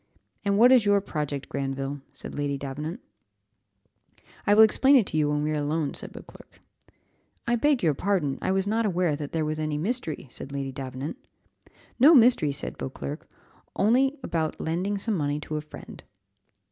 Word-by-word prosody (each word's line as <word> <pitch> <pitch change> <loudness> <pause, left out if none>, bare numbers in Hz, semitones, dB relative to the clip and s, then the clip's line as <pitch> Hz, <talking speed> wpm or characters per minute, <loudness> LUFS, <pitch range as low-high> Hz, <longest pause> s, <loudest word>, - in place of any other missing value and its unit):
"And 200 -1 +1
what 245 +4 +7
is 255 -4 +6
your 205 -1 +4
project, 150 -7 -4
Granville?" 135 0 -4
said - - -10
Lady 145 -1 -2
Davenant. 150 - -6 1.5
"I 205 - +5
will 220 - +9
explain 265 +6 +5
it 245 -7 +5
to - - -6
you 150 -1 +2
when 150 0 0
we 155 - -1
are - - -1
alone," 150 0 -1
said - - -8
Beauclerc. - - -14 0.9
"I 240 -1 +2
beg 275 0 +2
your 160 -3 +3
pardon, 150 -5 -1
I - - 0
was 190 0 +1
not 220 +3 0
aware 175 -5 +1
that 145 -1 -6
there 160 -2 -1
was 155 0 -3
any 155 -1 -2
mystery," 180 - -3
said 140 - -8
Lady 140 -1 -4
Davenant. 135 - -6 0.8
"No 300 +6 +8
mystery," 235 - +5
said 140 - -4
Beauclerc, 140 +3 -6 0.5
"only 260 +7 +2
about 160 -6 -2
lending 180 +5 -1
some 220 +3 -1
money 145 -5 -1
to 155 - -5
a - - -3
friend." 150 - -12
155 Hz, 175 wpm, -26 LUFS, 145-210 Hz, 1.5 s, will